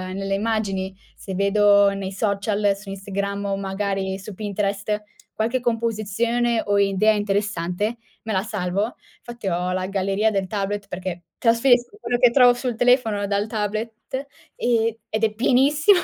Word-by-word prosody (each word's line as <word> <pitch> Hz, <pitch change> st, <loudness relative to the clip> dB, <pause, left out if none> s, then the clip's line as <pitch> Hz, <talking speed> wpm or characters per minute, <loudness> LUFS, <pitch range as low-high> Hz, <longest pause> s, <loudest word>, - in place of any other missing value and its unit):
nelle 195 Hz, 0 st, -2 dB
immagini. 195 Hz, -3 st, -1 dB, 0.2 s
Se 190 Hz, -, -7 dB
vedo 200 Hz, +1 st, +5 dB
nei 195 Hz, -1 st, -4 dB
social, 200 Hz, 0 st, 0 dB
su 200 Hz, 0 st, -11 dB
Instagram 200 Hz, +1 st, -3 dB
o 195 Hz, -1 st, -1 dB
magari 195 Hz, -1 st, -2 dB
su 195 Hz, +2 st, -8 dB
Pinterest 205 Hz, +1 st, -2 dB, 0.3 s
qualche 235 Hz, +4 st, -1 dB
composizione 230 Hz, 0 st, 0 dB
o 205 Hz, 0 st, +2 dB
idea 200 Hz, +2 st, +3 dB
interessante, 205 Hz, 0 st, -1 dB, 0.3 s
me 220 Hz, -, -3 dB
la 190 Hz, 0 st, +1 dB
salvo. 205 Hz, +1 st, -2 dB, 0.3 s
Fatti 235 Hz, -4 st, -7 dB
ho 180 Hz, 0 st, 0 dB
la 185 Hz, 0 st, -1 dB
galleria 195 Hz, +2 st, +1 dB
del 195 Hz, -2 st, -1 dB
tablet 200 Hz, 0 st, -3 dB
perché 180 Hz, -1 st, -5 dB
trasferisco 245 Hz, -, +3 dB
quello 245 Hz, -, 0 dB
che 240 Hz, 0 st, +5 dB
trovo 245 Hz, -1 st, +6 dB
sul 245 Hz, -1 st, -3 dB
telefono 230 Hz, -4 st, +2 dB
dal 200 Hz, +1 st, 0 dB
tablet 220 Hz, +5 st, -4 dB, 0.3 s
e 230 Hz, -2 st, +1 dB
ed 220 Hz, +1 st, -2 dB
è 220 Hz, -1 st, +2 dB
pienissimo. 285 Hz, -, +4 dB
205 Hz, 145 wpm, -23 LUFS, 195-230 Hz, 0.3 s, trovo